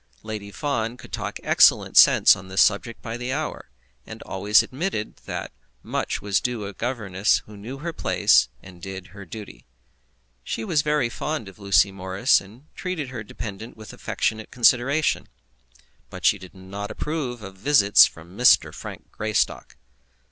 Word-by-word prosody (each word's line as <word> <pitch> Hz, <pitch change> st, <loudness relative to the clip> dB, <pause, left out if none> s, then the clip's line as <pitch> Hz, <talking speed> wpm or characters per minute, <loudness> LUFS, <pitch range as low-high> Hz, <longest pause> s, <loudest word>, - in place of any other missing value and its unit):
Lady 105 Hz, -2 st, -6 dB
Fawn 115 Hz, +1 st, -2 dB
could -, -, -14 dB
talk -, -, -4 dB
excellent -, -, +4 dB
sense -, -, +7 dB
on 95 Hz, -, -11 dB
this 95 Hz, 0 st, -2 dB
subject 110 Hz, +3 st, -1 dB
by 115 Hz, +1 st, -5 dB
the 125 Hz, +1 st, -4 dB
hour, -, -, -4 dB, 0.3 s
and -, -, -10 dB
always 100 Hz, +3 st, +3 dB
admitted 135 Hz, -, -4 dB
that -, -, -5 dB, 0.3 s
much -, -, -3 dB
was 100 Hz, -2 st, +1 dB
due 125 Hz, -3 st, -2 dB
to -, -, -5 dB
a 100 Hz, -, -6 dB
governess 105 Hz, -4 st, 0 dB
who 105 Hz, -, -13 dB
knew 115 Hz, +7 st, -8 dB
her 165 Hz, +4 st, -5 dB
place -, -, +3 dB
and 90 Hz, -2 st, -14 dB
did 95 Hz, 0 st, -8 dB
her 100 Hz, -1 st, -10 dB
duty. 105 Hz, +3 st, -10 dB, 0.8 s
She 115 Hz, -, -4 dB
was 150 Hz, +5 st, +1 dB
very 150 Hz, -3 st, +1 dB
fond 150 Hz, 0 st, -4 dB
of 95 Hz, +1 st, -13 dB
Lucy 100 Hz, 0 st, +3 dB
Morris, 95 Hz, +6 st, +2 dB
and 110 Hz, +8 st, -16 dB
treated 180 Hz, -7 st, -4 dB
her 125 Hz, -3 st, -6 dB
dependent 110 Hz, +1 st, -8 dB
with 110 Hz, -1 st, -11 dB
affectionate 110 Hz, 0 st, -2 dB
consideration; 130 Hz, +5 st, +2 dB, 0.8 s
but -, -, -8 dB
she 100 Hz, -, +4 dB
did 95 Hz, 0 st, -13 dB
not 100 Hz, +2 st, -7 dB
approve 130 Hz, -7 st, -4 dB
of 95 Hz, -1 st, -9 dB
visits 105 Hz, -3 st, +6 dB
from 85 Hz, +3 st, -14 dB
Mr. 125 Hz, +3 st, +5 dB
Frank -, -, -10 dB
Greystock. 110 Hz, 0 st, -2 dB
110 Hz, 160 wpm, -24 LUFS, 100-125 Hz, 0.8 s, sense